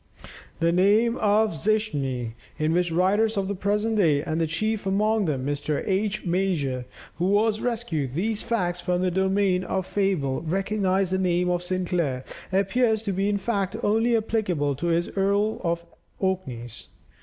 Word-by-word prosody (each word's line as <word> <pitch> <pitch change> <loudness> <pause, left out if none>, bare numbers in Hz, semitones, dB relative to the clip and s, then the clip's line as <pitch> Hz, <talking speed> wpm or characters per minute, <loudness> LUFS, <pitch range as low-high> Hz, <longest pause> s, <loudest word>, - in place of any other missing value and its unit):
The 165 0 +3
name 210 +6 +3
of 215 +1 +3
Zichmni, 145 - -1 0.2
in 155 0 +1
which 175 0 +1
writers 205 +6 +2
of 195 -1 0
the 200 - -1
present 210 +3 0
day, 150 -7 +3
and 160 0 -1
chief 215 +4 -1
among 210 +2 +2
them 135 -5 -1
Mr. 145 +1 -2
H. 200 +1 -1
Major, 170 -9 0 0.3
who 200 +5 +3
has 215 -1 -1
rescued 180 - -2
these 210 +5 0
facts 180 -7 -1
from 180 0 0
the 185 - +1
domain 190 0 +1
of 185 0 -2
fable, 180 -11 0
recognize 190 +2 0
the 190 - +1
name 180 -1 +1
of 175 0 0
Sinclair 175 -7 -1 0.3
appears 220 +4 +2
to 205 - -1
be 195 +2 0
in 205 - +1
fact 200 -2 -1
only 225 +3 +3
applicable 185 -10 0
to 170 - -2
this 170 +1 +1
earl 200 +2 +1
of 170 -1 0
the 170 +3 -9
Orkneys. 130 - -4
190 Hz, 160 wpm, -25 LUFS, 170-210 Hz, 0.3 s, The